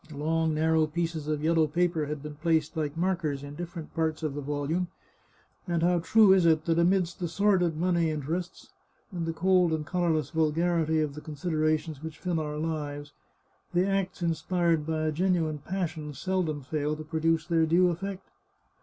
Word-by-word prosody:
Long 160 +2 0
narrow 160 0 +3
pieces 165 -1 -3
of 150 -1 -1
yellow 160 -1 +3
paper 170 -1 0
had 150 -1 -5
been 150 0 -6
placed, 160 +1 0
like 155 -1 -2
markers, 165 -6 -1
in 145 0 -8
different 170 0 -7
parts 160 0 -1
of 155 -3 -1
the 145 - -4
volume, 145 +5 -1 0.8
and 170 -2 0
how 175 0 +3
true 205 +3 +6
is 190 -2 +4
it 160 -2 +3
that 165 0 +2
amidst 175 0 +2
the 175 - -1
sordid 180 -3 +2
money 170 -1 +2
in 155 -2 -3
terests, 170 +5 -4 0.4
and 170 -3 -3
the - - 0
cold 180 +1 +3
and 155 -1 -2
colourless 160 -4 0
vulgarity 160 0 +1
of 150 -2 -1
the 150 - -8
consid 155 +4 -5
erations 155 -1 0
which 160 0 -7
fill 175 -3 -1
our 150 -1 -3
lives, 150 -2 -4 0.6
the 180 +1 +4
acts 195 -2 -1
inspired 170 -1 +1
by 160 -1 -1
a 155 - +1
genuine 165 -2 0
passion 160 -3 -4
seldom 170 -4 -1
fail 150 +2 -1
to 155 - -7
produce 160 +1 0
their 165 -2 +2
due 175 +2 +4
eflfect! 195 +2 -5
160 Hz, 180 wpm, -28 LUFS, 155-175 Hz, 0.8 s, true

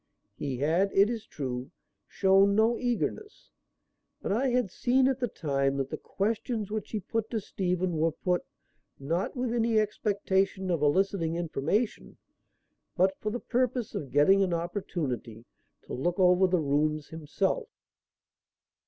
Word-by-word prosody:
He 135 -3 -3
had, 165 +8 +2
it 200 +3 +5
is 225 -2 -5
true, 130 -2 -5 0.4
shown 195 +1 +4
no 220 +2 +4
eagerness, 250 - -3 0.7
but - - -3
I 245 +7 +1
had 245 -6 +1
seen 260 +5 +2
at 265 -1 0
the 245 - 0
time 140 -7 -1
that 135 -1 -2
the - - -1
questions 220 +1 -2
which 215 -1 -3
he 215 - -2
put 220 +3 -3
to 225 - -1
Stephen 180 -3 -1
were 165 +1 +2
put, 180 +1 -1 0.5
not 165 - -2
with 250 -2 -1
any 230 -2 +2
expectation 195 -3 0
of 165 -4 0
eliciting 165 +2 +1
information 175 - -2 0.8
but 190 +2 +3
for 215 - -2
the 240 +3 -3
purpose 250 -2 -1
of 140 - -4
getting 150 +9 +5
an 180 -3 +1
opportunity 155 - -4 0.4
to - - -9
look 175 +7 -1
over 180 0 +5
the 180 -2 +1
rooms 150 +1 0
himself. 165 - -2
190 Hz, 145 wpm, -29 LUFS, 155-220 Hz, 0.8 s, it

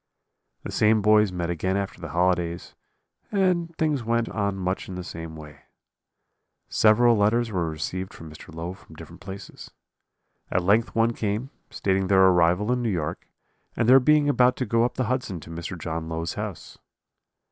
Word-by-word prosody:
"The - - -6
same 110 -1 +3
boys 105 -1 +4
met 85 -1 -3
again 95 +3 -1
after 100 -3 -4
the 85 - -6
holidays, 85 0 0 0.6
and 180 -4 +1
things 150 -5 0
went 115 0 0
on 100 -2 -1
much 95 0 -3
in 95 - -6
the 90 - -5
same 80 -2 -8
way. 75 -2 -12 1.1
"Several 115 +2 +4
letters 110 +3 +2
were 85 -4 -1
received 90 +4 -4
from 80 - -11
Mr. 75 - -12
Low 85 +3 -5
from - - -16
different - - -12
places; 95 0 -9 0.8
at 90 - 0
length 110 +5 +2
one 115 +1 +2
came, 110 +5 -3 0.2
stating 95 -1 0
their 95 0 +5
arrival 90 +4 +3
in 125 0 0
New 120 - 0
York, 80 -7 -3 0.5
and 115 - +1
their 130 +2 +8
being 150 +2 +3
about 125 -3 +4
to 130 - -2
go 115 +1 +2
up 120 - -1
the 130 - 0
Hudson 120 -7 -2
to 85 - -11
Mr. 85 +2 -6
John 80 0 -5
Low's 80 0 -3
house. - - -7
100 Hz, 175 wpm, -25 LUFS, 85-115 Hz, 1.1 s, their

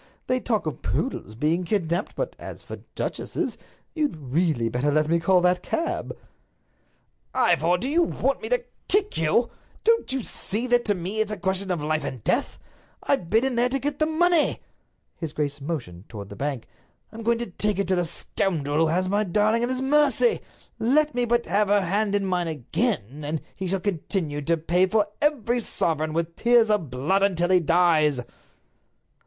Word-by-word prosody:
They 255 - +1
talk 225 -6 -1
of 155 - -4
poodles 110 - -3
being 155 +8 +1
kidnaped, 175 -1 -1
but - - -3
as - - -9
for - - -8 0.2
duchesses—You'd 300 - -4
really 145 -3 0
better 125 +5 0
let 155 +1 +2
me 170 +1 +2
call 180 +2 +3
that 180 0 +2
cab." 330 +1 -3 1.2
"Ivor, 175 -7 +3
do 240 - -3
you 320 +5 +3
want 275 -5 0
me - - -3
to - - +1 0.2
kick 410 +1 +1
you? 165 +10 +1 0.3
Don't 460 - +2
you 265 -2 -2
see 220 +4 -3
that 245 -1 +2
to 205 - +1
me 185 +5 -1
it's 215 -1 0
a 215 - -3
question 190 0 -1
of 175 -5 -1
life 155 +1 0
and 125 -5 -6
death? - - 0 0.5
I've 170 - 0
been 225 +6 +3
in 265 -2 0
there 240 +1 +3
to 270 - 0
get 285 +1 -3
the 310 - +3
money." 335 0 +2 0.5
His 160 -3 -5
grace 145 -1 -2
motioned 120 - -5
toward 100 -3 -8
the 100 - -9
bank. 135 -3 -3 0.4
"I'm 225 +1 -8
going 230 +1 +2
to 235 -4 -4
take 210 +2 0
it 200 - 0
to 190 - +3
the 175 - +1
scoundrel 160 -3 -1
who 165 - +4
has 180 +4 +1
my 205 +3 +1
darling 215 +4 +2
at 240 - 0
his 255 0 -1
mercy. 295 - +3 0.4
Let 295 +6 +2
me 245 0 +1
but 235 0 +1
have 200 +4 +2
her 205 0 +3
hand 200 +3 0
in 200 -1 +1
mine 180 -2 0
again, 150 - -2
and 150 +2 -2 0.2
he 190 - -4
shall 195 +2 0
continue 170 -4 -2
to 165 +3 +1
pay 175 +4 +2
for 210 +1 +1
every 250 -5 +1
sovereign 155 -8 -1
with 165 0 -2
tears 235 -2 +4
of 200 -9 +1
blood 145 +11 0
until 180 -3 +2
he 185 - +6
dies." 165 -5 +3
190 Hz, 190 wpm, -25 LUFS, 160-235 Hz, 1.2 s, he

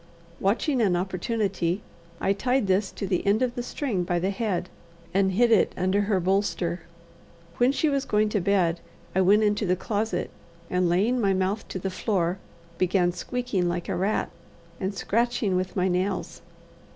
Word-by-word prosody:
Watching 240 +7 +1
an 195 -5 +3
opportunity, 190 0 -1 0.4
I 195 - +2
tied 250 +3 +1
this 190 +1 +1
to - - -4
the 185 -2 0
end 210 +5 +2
of 245 -1 0
the 245 - -3
string 240 -6 -2
by 175 0 0
the 185 +3 0
head, 195 -4 -2 0.5
and 190 0 +2
hid 235 +4 +3
it 220 - +4
under 185 +3 +2
her 200 -2 +1
bolster. 180 -2 0 0.8
When 245 +2 +4
she 310 - +1
was 280 -2 +1
going 210 0 +2
to 210 -2 0
bed, 175 -3 +2 0.3
I 190 - +3
went 205 +4 +5
into 210 -1 +1
the 180 - +3
closet, 210 +3 -2 0.4
and, 180 -1 +2
laying 215 +8 +2
my 195 -2 +3
mouth 190 +3 -1
to - - -5
the 190 +1 -3
floor, 185 -2 0 0.4
began 180 -1 +2
squeaking 225 -3 -2
like 175 0 -3
a - - 0
rat, 195 +4 0 0.5
and 195 +1 -2
scratching 230 -2 0
with 185 0 -2
my 185 -1 +2
nails. 185 +1 -2
195 Hz, 175 wpm, -26 LUFS, 185-220 Hz, 0.8 s, went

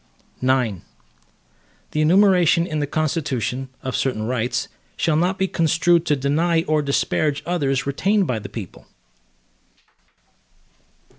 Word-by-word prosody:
IX 125 -7 +1 1.1
The 155 - 0
enumeration 180 0 +4
in 155 -4 -3
the 145 - -1
Constitution, 135 -4 -2
of 130 -1 -3
certain 125 -5 -1
rights, 120 +1 -1 0.3
shall 160 - +1
not 180 +4 +1
be 190 - 0
construed 170 0 +2
to 150 - +3
deny 160 +5 +1
or 155 -1 +1
disparage 145 +1 0
others 140 -7 0
retained 195 +9 +1
by 125 -8 -2
the - - -9
people. - - -9
150 Hz, 120 wpm, -21 LUFS, 135-170 Hz, 1.1 s, enumeration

